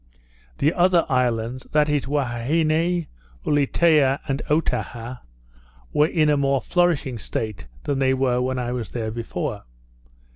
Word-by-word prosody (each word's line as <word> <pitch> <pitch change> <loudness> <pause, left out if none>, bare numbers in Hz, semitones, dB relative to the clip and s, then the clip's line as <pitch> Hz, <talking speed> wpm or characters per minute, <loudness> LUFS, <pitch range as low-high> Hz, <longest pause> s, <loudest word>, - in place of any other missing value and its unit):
The 150 +4 +2
other 175 -1 +3
islands, 125 -1 0
that 150 -1 +4
is, 150 -2 0
Huaheine, 155 +6 0 0.4
Ulietea, 145 -1 +3
and 135 0 -1
Otaha, 125 -5 -1 0.7
were 150 +1 +4
in 155 -2 +2
a 150 - +4
more 140 -1 +2
flourishing 155 -7 0
state 105 - -4 0.2
than 140 -1 -1
they 130 -1 +3
were 125 -2 +1
when 130 +1 -1
I 120 -1 -2
was 120 -6 -4
there 110 -2 -3
before. 115 +1 -4
135 Hz, 135 wpm, -23 LUFS, 125-155 Hz, 0.7 s, that